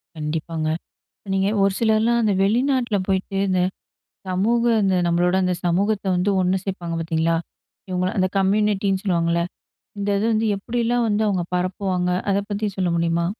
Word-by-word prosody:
கண்டிப்பாங்க. 155 +1 -3 0.7
நீங்க 195 0 +1 0.2
ஒரு 195 -1 +3
சிலர்லாம் 225 +1 +3
அந்த 210 -3 +2
வெளிநாட்டில 240 0 +1
போய்ட்டு, 195 0 -1
இந்த 185 -1 +2 0.7
சமூக 210 +6 +1 0.2
இந்த 190 -1 +2
நம்மளோட 175 +2 +2
அந்த 180 - +1
சமூகத்த 200 +4 +1
வந்து 180 +3 +1
ஒண்ணு 185 +1 +2
சேப்பாங்க 175 -4 -4
பாத்தீங்களா, 165 0 0 0.5
இவங்கள 185 0 0
அந்த 185 -1 +3
கம்யூனிட்டின்னு 195 -1 +1
சொல்லுவாங்கல்ல. 170 -3 +1 0.6
இந்த 200 0 -2
இது 215 - 0
வந்து 220 +1 +1
எப்படிலாம் 235 +3 0
வந்து 210 +1 +1
அவங்க 190 -3 0
பரப்புவாங்க? 180 0 -1 0.2
அத 195 - +2
பத்தி 205 +1 -1
சொல்ல 185 -2 0
முடியுமா? 170 0 +1
190 Hz, 145 wpm, -22 LUFS, 180-210 Hz, 0.7 s, ஒரு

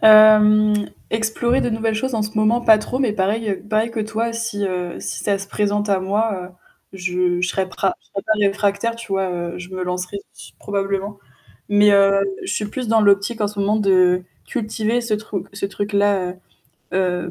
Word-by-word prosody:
Hem 215 -1 +6 0.2
explorer 225 +3 0
de - - 0
nouvelles 225 -1 -1
choses 260 +4 -2
en 220 - 0
ce 215 +1 -5
moment, 220 +3 +3
pas 220 -2 +6
trop, 245 +4 -4
mais 255 -6 +1
pareil 210 +2 -1
heu, 190 - -4
pareil 220 +2 +1
que 230 - -3
toi, 225 +2 -2
si, 230 -3 -3
heu, 180 -2 -3
si - - -5
ça 200 -1 0
se 195 - -7
présente 205 0 -1
à 195 -1 +2
moi, 200 0 -1 0.5
heu, - - -9
je 180 -1 0
je 180 - 0
serais 190 0 -1
pas 190 +1 -1
je - - -31
serais 195 - -6
pas 220 - +2
réfractaire, 200 +3 0
tu 230 0 -10
vois, 190 -1 0
heu, 175 -1 -4
je 180 0 -9
me 185 -1 -5
lancerai 180 +2 -3 0.4
probablement. 200 0 -3 0.5
Mais 205 0 +5
heu, 195 0 +5 0.2
je - - -4
suis 210 - -2
plus 245 +4 -5
dans 225 0 +4
l'optique 205 +3 +2
en 210 - +2
ce 205 0 -7
moment 205 +2 +2
de 185 -3 +3 0.2
cultiver 220 -1 -1
ce 235 -2 -2
truc 210 -3 -4
ce 200 0 -3
truc-là. 200 -2 0 0.6
Heu 180 -2 0
205 Hz, 200 wpm, -20 LUFS, 195-220 Hz, 0.6 s, Hem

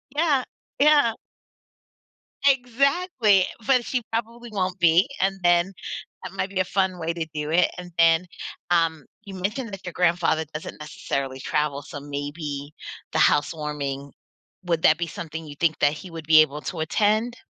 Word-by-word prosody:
Yeah. 295 -5 +2 0.4
Yeah. 290 -6 +5 1.3
Exactly, 260 - +3 0.2
but, 255 -3 +3
she 250 -2 -1
probably 235 +1 -4
won't 185 -2 -2
be, 170 +6 +5
and 195 0 +1
then, 175 +2 +3 0.5
that 185 - -7
might 195 0 -2
be 195 -1 -3
a - - +4
fun 185 -1 0
way 165 +1 -2
to 165 -2 -3
do 150 0 -3
it. 175 +2 +4
And 180 -1 -8
then, 165 +1 +5 0.4
um, 165 -4 +1 0.2
you 200 -2 -9
mentioned 210 +5 -3
that 195 - -8
your 180 - -5
grandfather 170 -2 +2
doesn't 155 0 -7
necessarily 140 -4 -4
travel, 145 +1 -1
so 145 -3 -8
maybe 145 0 -5 0.4
the - - 0
housewarming 145 -2 0 0.5
would 170 -2 -1
that 155 - +6
be 170 -1 -2
something 160 0 -7
you 145 - -9
think 160 +1 +1
that 145 0 +3
he 180 +4 -9
would 160 -2 -8
be 155 -1 +8
able 150 0 0
to 170 - -5
attend? 215 +8 +1
170 Hz, 160 wpm, -24 LUFS, 155-205 Hz, 1.3 s, be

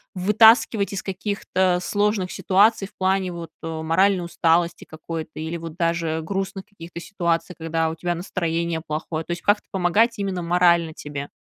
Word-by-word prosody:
вытаскивать 210 +2 +4
из 195 - -4
каких-то 190 -2 -1
сложных 205 -1 0
ситуаций 200 +1 +3
в 205 - -25
плане 190 0 +1
вот, 170 -2 -8
э, - - -6 0.2
моральной 185 +3 +2
усталости 170 +1 +1
какой-то 155 0 -7
или 160 +2 -4
вот 165 -1 -8
даже 165 -2 0
грустных 195 +1 -4
каких-то 170 -4 -10
ситуаций, 170 -2 -2
когда 165 0 -1
у 160 - -5
тебя 175 +2 -2
настроение 170 -2 -2
плохое, 155 +1 -3
то - - -7
есть 175 0 -3
как-то 205 0 +2
помогать 205 +6 +2
именно 195 -3 -2
морально 170 -1 +3
тебе? 145 -2 -7
175 Hz, 155 wpm, -23 LUFS, 165-195 Hz, 0.2 s, вытаскивать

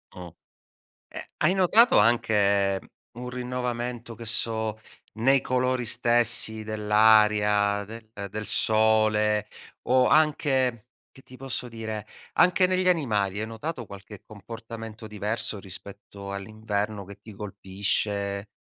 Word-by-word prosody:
Uhm. 90 -2 -9 0.8
Ehm, - - -7 0.2
hai 185 - +2
notato 205 +6 +5
anche 100 -3 +2 0.4
un 125 0 -6
rinnovamento, 125 -1 -4
che 115 +2 -10
so, 110 -1 -1 0.4
nei 135 +5 +3
colori 130 0 0
stessi 120 -1 +2
dell'aria, 105 -1 +3
del 110 +2 -11 0.2
del 110 +1 -5
sole? 110 0 +3 0.4
O 130 0 +4
anche, 135 -6 +1 0.2
che 135 - -18
ti 130 - -15
posso 130 -1 -4
dire, 110 -2 -6 0.3
anche 180 +1 +4
negli 185 0 +1
animali? 105 - 0
Hai 110 - -3
notato 120 +4 -6
qualche 100 0 -12
comportamento 115 +1 -10
diverso 105 0 -4
rispetto 100 +1 -10
all'inverno, 105 0 -4
che 100 +1 -12
ti 110 +1 -12
colpisce? 100 0 -3
110 Hz, 115 wpm, -26 LUFS, 105-120 Hz, 0.8 s, notato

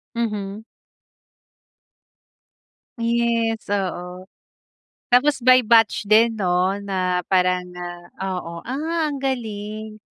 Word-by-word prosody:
Mhm. 210 -2 -3 2.3
Yes, 230 -1 0
oo. 180 -1 -4 0.9
Tapos 270 +3 +4
by 255 0 +6
batch 225 -2 +4
din 220 +2 +4
'no, 185 -1 +1
na 185 -2 -1
parang, 180 -1 +2 0.5
ah 190 -1 -2
oo, 170 -1 -6
ah, 315 +4 -1
ang 285 - -4
galing. 215 -4 -4
215 Hz, 90 wpm, -22 LUFS, 185-235 Hz, 2.3 s, by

